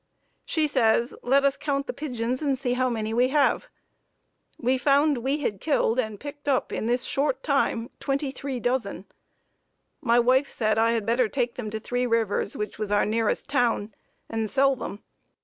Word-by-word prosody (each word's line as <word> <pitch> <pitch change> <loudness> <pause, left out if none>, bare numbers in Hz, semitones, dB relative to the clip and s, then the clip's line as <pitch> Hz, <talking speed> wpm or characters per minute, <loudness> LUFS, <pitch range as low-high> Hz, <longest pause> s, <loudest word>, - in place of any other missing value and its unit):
She 315 -2 +1
says, 235 -3 +2
let 275 +3 +3
us 280 0 +3
count 280 -2 -1
the - - -4
pigeons 250 -3 -3
and 280 -3 +1
see 245 -1 -1
how 255 0 +1
many 220 -2 -2
we 245 +2 +3
have. 285 +1 +2 0.9
We 255 +1 +1
found 285 0 +3
we 275 +5 -1
had 205 -8 -2
killed 265 -5 +1
and 220 -4 -2
picked 290 0 -9
up 270 -3 +1
in 220 - -2
this 245 +1 +1
short 270 -1 0
time 275 -5 0
twenty 275 0 -1
three 265 -1 -5
dozen. 245 +1 -2 1.0
My 235 -1 +3
wife 260 +4 +3
said 215 -1 0
I 230 +1 +3
had 225 -3 -1
better 235 0 +2
take 245 -2 -1
them 230 -4 -5
to 220 +1 -4
Three 245 +3 -1
Rivers, 225 -3 0
which 210 0 -5
was 210 -2 -3
our 205 - +3
nearest 220 +1 0
town, 240 -6 0 0.3
and 225 -1 -2
sell 270 +5 +3
them. 210 -4 -7
250 Hz, 185 wpm, -26 LUFS, 225-275 Hz, 1.0 s, let